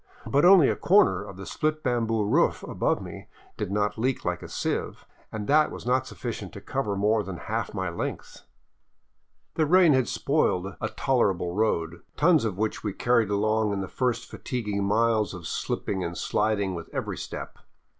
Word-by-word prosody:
But 140 +4 +2
only 180 -6 +8
a - - +1
corner 200 - +4
of 100 -2 -10
the 95 - -8
split 155 +6 -2
bamboo 115 -4 +1
roof 105 - +2
above - - -1
me - - -9 0.3
did - - -4
not 105 +1 0
leak 130 +3 -1
like - - -1
a - - -9
sieve, - - -3 0.3
and 110 -1 -4
that 150 +2 +4
was - - -9
not 130 +1 +1
sufficient 110 -6 -6
to - - -8
cover 105 -2 -2
more 105 +2 +2
than 95 -3 -6
half 110 +2 -4
my 95 -1 -2
length. 85 0 -5 1.1
The 155 - +1
rain 175 -1 +6
had 130 -2 +2
spoiled 95 - 0
a 110 - -1
tolerable 100 -11 0
road, 85 -5 0 0.2
tons 160 -4 +4
of 100 -5 -2
which 110 +1 -2
we 105 -3 -2
carried 115 -1 +2
along 105 +1 +1
in 100 - -2
the 95 - -4
first 120 +2 -1
fatiguing 105 -5 -3
miles 110 0 +1
of 85 -3 -9
slipping 95 +4 -2
and 85 +1 -4
sliding 105 -3 0
with 85 -1 -7
every - - -3
step. - - -7
110 Hz, 180 wpm, -26 LUFS, 100-130 Hz, 1.1 s, only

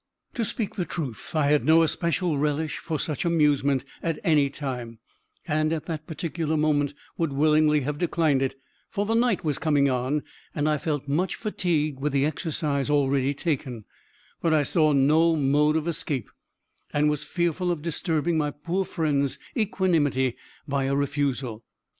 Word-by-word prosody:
To 235 - -1
speak 220 0 -3
the 180 - +1
truth, 145 -6 -6
I 155 -2 +3
had 150 - +3
no 160 +1 +5
especial 170 -1 0
relish 150 +1 -1
for 160 - -3
such 150 -3 -2
amusement 145 -5 +2 0.2
at 165 -2 -1
any 150 -6 +3
time, 125 -5 -5 0.5
and, 155 0 +1
at 160 -2 -2
that 155 -2 -5
particular 160 -1 -2
moment, 145 -2 +1 0.2
would 165 -3 0
willingly 150 +1 +3
have 145 +2 -3
declined 160 -5 +2
it; 135 - -1 0.3
for 205 - -1
the 225 - 0
night 230 -5 +2
was 150 -3 0
coming 145 -3 +2
on, 130 +4 -1 0.3
and 145 0 0
I 150 -1 +1
felt 145 -3 -2
much 165 +7 0
fatigued 160 - -1
with 145 +1 -1
the 140 0 +3
exercise 150 -2 -1
already 140 -1 +2
taken; 130 - -2 0.6
but 165 -2 +3
I 150 - +3
saw 155 0 +3
no 155 +4 +4
mode 150 +1 +3
of 160 +1 0
escape, 145 -7 -3 0.6
and 150 +1 +2
was 150 -1 0
fearful 175 0 -1
of 170 -4 -2
disturbing 165 0 0
my 150 -1 +1
poor 170 +6 -2
friend's 145 -6 0 0.2
equanimity 165 - +1 0.3
by 140 -1 0
a 135 +1 +1
refusal. 140 -5 -1
150 Hz, 165 wpm, -26 LUFS, 140-165 Hz, 0.6 s, no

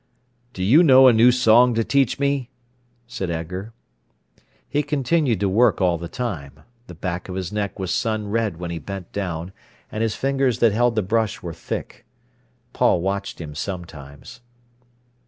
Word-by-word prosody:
"Do 95 - -4
you 130 - +6
know 130 -5 +7
a 125 - +7
new 115 +3 +6
song 120 0 +4
to 115 - +1
teach 135 0 +1
me?" 140 -3 -1 0.6
said 115 -7 -5
Edgar. 90 +6 -5 1.0
He 145 +4 0
continued 145 - 0
to 100 - +2
work 110 +4 +3
all 90 -3 +1
the 85 - -6
time. 80 - -6 0.3
The 90 - -10
back 90 +2 -5
of 90 - -5
his 95 0 -4
neck 100 -1 -3
was 95 -2 -3
sun 110 -3 -1
red 110 -6 -1
when 85 0 -5
he 85 - -4
bent 95 +2 -8
down, 90 -2 -4 0.4
and 110 - -4
his 115 -2 0
fingers 135 -3 0
that 115 - +4
held 120 +2 +1
the 110 - +1
brush 110 +1 -1
were 85 -2 -5
thick. 80 - -6 0.7
Paul - - +2
watched 100 +2 -3
him 75 -3 -7
sometimes. 75 - -8
105 Hz, 170 wpm, -22 LUFS, 90-120 Hz, 1.0 s, know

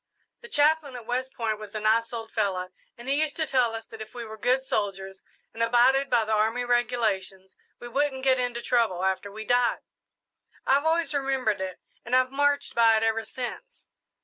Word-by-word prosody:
"The 475 - -12
chaplain 300 - +2
at 240 -2 -8
West 255 +2 -2
Point 220 -3 -2
was 215 -1 -10
a - - -1
nice 225 +2 +2
old 225 -2 -6
fellow, 190 -4 -1 0.3
and 240 +2 -11
he 280 +3 +2
used 310 -2 0
to 320 - -1
tell 250 -6 +1
us 225 - -7
that 225 -1 -11
if 215 - -10
we 240 -1 -5
were 220 0 -8
good 250 +4 +1
soldiers 195 -5 -3 0.3
and 225 - -6
abided 245 +4 +4
by 235 -3 +3
the 220 - -4
army 220 +3 +1
regulations, 220 -6 -1 0.2
we 240 - -8
wouldn't 265 +1 -1
get 260 -1 +3
into 245 -1 -2
trouble 220 -7 +1
after 190 +1 -1
we 220 +2 -8
died. 245 0 +2 0.8
I've 280 +3 +3
always 325 0 +1
remembered 265 -7 0
it 185 -1 -5 0.2
and 245 +2 0
I've 255 0 +3
marched 285 +1 +1
by 230 -1 +5
it 220 - 0
ever 225 0 +1
since." 370 - -7
240 Hz, 200 wpm, -26 LUFS, 220-265 Hz, 0.8 s, by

